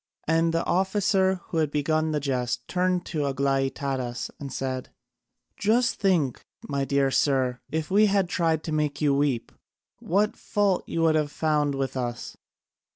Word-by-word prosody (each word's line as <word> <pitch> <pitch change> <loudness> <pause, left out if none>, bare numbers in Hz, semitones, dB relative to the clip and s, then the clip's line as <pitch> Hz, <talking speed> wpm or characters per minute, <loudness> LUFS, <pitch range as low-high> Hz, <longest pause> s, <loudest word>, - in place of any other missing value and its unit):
And 165 +1 +3
the 165 0 0
officer 190 0 +1
who 165 - -3
had 155 -2 +2
begun 155 +2 0
the 150 -1 0
jest 125 -3 -2
turned 180 -1 0
to 160 - -4
Aglaïtadas 135 -2 -1
and 140 -2 -6
said: 130 -1 -3 0.7
"Just 235 +4 +2
think, 170 - +1 0.2
my 140 -1 -1
dear 140 -1 +1
sir, 130 -3 +1
if 160 +2 -3
we 210 +2 +5
had 195 -2 +2
tried 165 -3 0
to 160 - -4
make 150 -2 -1
you 145 -2 +2
weep! 140 -4 0 0.5
What 205 +4 +1
fault 205 -4 0
you 165 - -1
would 160 -1 +4
have 150 -2 0
found 150 -3 +1
with 135 -1 -2
us! 120 -2 -4
155 Hz, 155 wpm, -26 LUFS, 135-180 Hz, 0.7 s, we